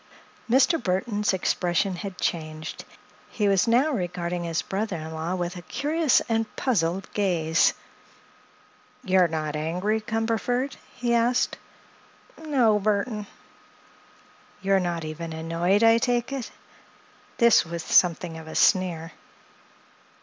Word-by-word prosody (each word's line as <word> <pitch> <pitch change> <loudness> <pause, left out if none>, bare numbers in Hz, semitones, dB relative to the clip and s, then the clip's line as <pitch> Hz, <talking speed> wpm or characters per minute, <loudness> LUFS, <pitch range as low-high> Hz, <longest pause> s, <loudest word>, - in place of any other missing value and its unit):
Mr. 275 +7 +4
Burthon's 205 +2 0
expression 180 0 0
had 195 0 -7
changed. 155 -1 -4 0.4
He 210 -3 0
was 195 +2 +3
now 250 +7 +3
regarding 175 - -3
his 165 -1 -1
brother 200 0 -3
in 160 0 -6
law 160 +3 -3
with 175 -1 -3
a - - -7
curious 300 - +1
and 225 -1 -2
puzzled 190 -6 0
gaze. 170 -6 +2 1.3
"You're 185 -4 +4
not 155 -2 -3
angry, 180 +8 -1
Cumberford?" 230 +4 -1 0.2
he 240 -1 -1
asked. 235 +1 +2 0.8
"No, 255 -9 +2
Burthon." 210 +1 -1 1.4
"You're 195 0 +3
not 170 -3 -2
even 160 +1 -6
annoyed, 165 +6 0
I 225 0 +6
take 245 +2 0
it?" 265 -4 -4 0.9
This 235 -1 +5
with 170 0 -6
something 170 -2 +2
of 160 - -11
a 160 - -8
sneer. 175 -4 +2
190 Hz, 120 wpm, -25 LUFS, 170-230 Hz, 1.4 s, I